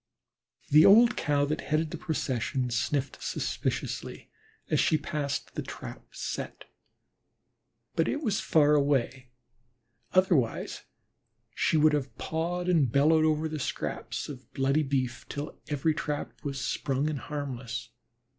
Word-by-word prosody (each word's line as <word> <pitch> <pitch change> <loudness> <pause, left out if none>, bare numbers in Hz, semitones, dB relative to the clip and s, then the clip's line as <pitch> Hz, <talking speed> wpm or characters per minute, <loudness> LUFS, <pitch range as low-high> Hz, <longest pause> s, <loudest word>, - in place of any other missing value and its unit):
The 155 +2 +8
old 230 +3 +7
Cow 145 -1 +1
that 155 +2 -2
headed 155 +1 0
the - - -4
procession 130 -5 -1
sniffed 130 +3 -1
suspiciously - - -3 0.4
as - - +1
she 155 - +4
passed 145 -1 -3
the - - -3
"trap - - -8
set," - - -5 1.3
but - - +2
it 295 - -1
was 210 -6 +1
far 150 -2 +4
away, 135 -3 +1 0.8
otherwise 175 - +1 0.7
she 160 - +2
would 155 0 +5
have 140 -2 -2
pawed 175 +2 -2
and 155 -9 +3
bellowed 155 +4 +4
over 155 0 +2
the 155 -1 -4
scraps 130 - -3
of 130 -3 -10
bloody 135 +3 +2
beef 130 -4 -2
till 145 +2 -6
every 150 +2 +1
trap 150 -1 -3
was 140 -2 -3
sprung 135 +2 -1
and 155 -3 -2
harmless. 125 -5 -5
145 Hz, 130 wpm, -29 LUFS, 135-155 Hz, 1.3 s, The